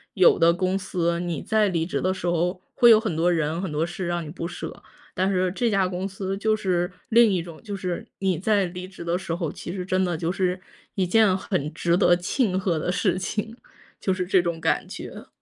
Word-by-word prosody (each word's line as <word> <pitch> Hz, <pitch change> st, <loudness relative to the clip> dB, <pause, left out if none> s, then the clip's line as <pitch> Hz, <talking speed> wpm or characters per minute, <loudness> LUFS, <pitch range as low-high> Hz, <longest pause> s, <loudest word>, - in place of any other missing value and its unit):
有 185 Hz, -2 st, +5 dB
的 165 Hz, 0 st, +6 dB
公 185 Hz, +2 st, 0 dB
司， 170 Hz, -3 st, -1 dB
你 170 Hz, -4 st, -3 dB
在 220 Hz, -1 st, +2 dB
离 165 Hz, -3 st, 0 dB
职 180 Hz, -, -2 dB
的 185 Hz, +1 st, +1 dB
时 190 Hz, -, -7 dB
候 175 Hz, +2 st, 0 dB, 0.2 s
会 240 Hz, -, +6 dB
有 220 Hz, -, +9 dB
很 220 Hz, -5 st, -2 dB
多 170 Hz, +3 st, +2 dB
人 160 Hz, 0 st, 0 dB
很 190 Hz, -4 st, -3 dB
多 150 Hz, +2 st, 0 dB
事 175 Hz, +1 st, -5 dB
让 175 Hz, -1 st, -2 dB
你 -, -, -8 dB
不 170 Hz, 0 st, -5 dB
舍， -, -, -7 dB, 0.3 s
但 185 Hz, 0 st, +1 dB
是 185 Hz, -1 st, +1 dB
这 235 Hz, +5 st, 0 dB
家 195 Hz, -3 st, +2 dB
公 185 Hz, +1 st, -3 dB
司 195 Hz, 0 st, -4 dB
就 215 Hz, +2 st, +1 dB
是 180 Hz, -4 st, 0 dB, 0.2 s
另 230 Hz, -1 st, +6 dB
一 175 Hz, -3 st, 0 dB
种。 170 Hz, -2 st, -11 dB
就 205 Hz, -3 st, -5 dB
是 180 Hz, -3 st, -4 dB
你 190 Hz, -4 st, 0 dB
在 200 Hz, 0 st, +2 dB
离 180 Hz, +1 st, -6 dB
职 185 Hz, -2 st, -10 dB
的 170 Hz, +1 st, 0 dB
时 170 Hz, -3 st, -3 dB
候， 165 Hz, -3 st, -3 dB
其 -, -, -7 dB
实 180 Hz, -2 st, -4 dB
真 185 Hz, 0 st, +1 dB
的 175 Hz, -2 st, -1 dB
就 165 Hz, +1 st, -1 dB
是 185 Hz, -1 st, -1 dB, 0.4 s
一 190 Hz, -, +1 dB
件 200 Hz, 0 st, +4 dB
很 175 Hz, -6 st, -2 dB
值 170 Hz, 0 st, +1 dB
得 180 Hz, -2 st, +5 dB
庆 185 Hz, +3 st, 0 dB
贺 180 Hz, -4 st, 0 dB
的 -, -, -2 dB
事 185 Hz, 0 st, +1 dB
情， 215 Hz, +4 st, -4 dB, 0.4 s
就 190 Hz, -, 0 dB
是 185 Hz, -1 st, -2 dB
这 185 Hz, 0 st, +4 dB
种 170 Hz, -1 st, -3 dB
感 -, -, +1 dB
觉。 -, -, -9 dB
185 Hz, 255 characters per minute, -24 LUFS, 175-195 Hz, 0.4 s, 有